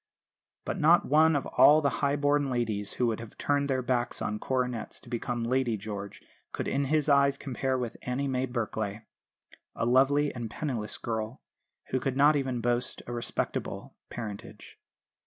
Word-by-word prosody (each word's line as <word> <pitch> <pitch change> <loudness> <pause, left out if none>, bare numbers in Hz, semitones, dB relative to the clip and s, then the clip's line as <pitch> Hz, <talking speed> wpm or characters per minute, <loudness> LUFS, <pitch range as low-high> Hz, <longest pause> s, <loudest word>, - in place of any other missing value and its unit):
But - - -3
not 170 +3 +5
one 160 +2 +5
of 140 - 0
all 150 +2 +6
the 140 -3 +1
high 140 0 +2
born 145 -1 +2
ladies, 110 -5 -1
who 125 - 0
would 115 -2 0
have 115 -2 -10
turned 145 0 0
their 130 -1 0
backs 120 -1 -1
on 105 0 -2
coronets 125 -3 -2
to - - -16
become 120 0 -2
"Lady 120 -1 +1
George," 100 -1 -7 0.3
could - - -3
in 140 +1 0
his 150 +1 +1
eyes 140 -1 +4
compare 130 -1 -2
with 120 -2 -4
Annie 130 +3 -2
May 130 -1 0
Berkelay, 110 -3 -3 0.7
a - - -1
lovely 135 +4 +3
and 120 -3 -5
penniless 115 -6 -4
girl, 110 +1 -4 0.5
who 130 - +1
could 135 0 -2
not 145 +2 +6
even 130 -4 -1
boast 120 +1 -1
a 120 - -6
"respectable" 120 -1 -3
parentage. 105 -4 -8
125 Hz, 170 wpm, -29 LUFS, 115-140 Hz, 0.7 s, all